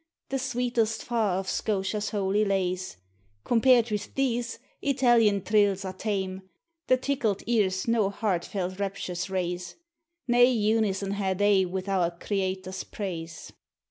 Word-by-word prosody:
The 270 Hz, -, -1 dB
sweetest 240 Hz, -4 st, 0 dB
far 220 Hz, -6 st, 0 dB
of 190 Hz, 0 st, -4 dB
Scotia's 205 Hz, +1 st, -1 dB
holy 205 Hz, 0 st, +1 dB
lays: 185 Hz, -, -1 dB, 0.5 s
Compared 240 Hz, -1 st, +4 dB
with 210 Hz, -1 st, -4 dB
these, 245 Hz, -3 st, -1 dB, 0.2 s
Italian 240 Hz, -8 st, +3 dB
trills 200 Hz, -2 st, +2 dB
are 185 Hz, -, -4 dB
tame; 190 Hz, -2 st, -3 dB, 0.5 s
The 255 Hz, -, +5 dB
tickled 255 Hz, -7 st, -1 dB
cars 200 Hz, -5 st, +1 dB
no 225 Hz, -4 st, +2 dB
heartfelt 185 Hz, -2 st, -2 dB
raptures 185 Hz, -2 st, -3 dB
raise; 180 Hz, -1 st, -3 dB, 0.5 s
Nae 240 Hz, 0 st, +3 dB
unison 215 Hz, -4 st, +1 dB
hae 195 Hz, -2 st, -1 dB
they 200 Hz, -1 st, +3 dB
with 185 Hz, +2 st, -4 dB
our 185 Hz, -3 st, +2 dB
Creator's 190 Hz, -1 st, -3 dB
praise. 170 Hz, -5 st, -6 dB
200 Hz, 125 wpm, -27 LUFS, 190-230 Hz, 0.5 s, The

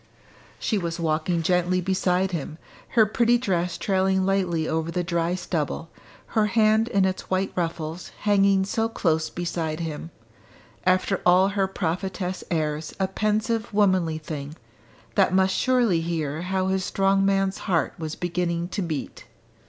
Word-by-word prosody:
She 215 Hz, -, 0 dB
was 170 Hz, -1 st, -3 dB
walking 165 Hz, +1 st, 0 dB
gently 180 Hz, +1 st, +2 dB
beside 185 Hz, 0 st, +1 dB
him, 160 Hz, -2 st, -4 dB, 0.4 s
her 220 Hz, -, +8 dB
pretty 235 Hz, +3 st, +3 dB
dress 180 Hz, -7 st, -1 dB
trailing 190 Hz, -1 st, +1 dB
lightly 180 Hz, -5 st, +1 dB
over 160 Hz, +1 st, -1 dB
the 175 Hz, +1 st, -1 dB
dry 170 Hz, 0 st, 0 dB
stubble, 165 Hz, -2 st, -3 dB, 0.4 s
her 215 Hz, -1 st, +3 dB
hand 220 Hz, +1 st, +3 dB
in 200 Hz, -5 st, +2 dB
its 190 Hz, 0 st, -3 dB
white 190 Hz, +1 st, 0 dB
ruffles 165 Hz, -1 st, -3 dB
hanging 200 Hz, -2 st, +3 dB
so 225 Hz, +3 st, 0 dB
close 160 Hz, -7 st, 0 dB
beside 170 Hz, -2 st, -3 dB
him 165 Hz, 0 st, -5 dB, 0.8 s
after 185 Hz, +1 st, +2 dB
all 185 Hz, +2 st, +5 dB
her 195 Hz, -1 st, 0 dB
prophetess 185 Hz, 0 st, -3 dB
airs 155 Hz, -2 st, -2 dB
a 190 Hz, -, +2 dB
pensive 215 Hz, +3 st, -1 dB
womanly 185 Hz, -6 st, +3 dB
thing, 150 Hz, -1 st, -6 dB, 0.6 s
that 190 Hz, -2 st, +3 dB
must 190 Hz, 0 st, +3 dB
surely 240 Hz, -10 st, +2 dB
hear 160 Hz, -2 st, -2 dB
how 185 Hz, +1 st, -1 dB
his 190 Hz, 0 st, 0 dB
strong 195 Hz, +1 st, +2 dB
man's 195 Hz, -1 st, +1 dB
heart 170 Hz, -4 st, +1 dB
was 160 Hz, -1 st, -4 dB
beginning 175 Hz, -1 st, -2 dB
to 200 Hz, -, -3 dB
beat! 160 Hz, -5 st, -5 dB
185 Hz, 145 wpm, -25 LUFS, 165-195 Hz, 0.8 s, her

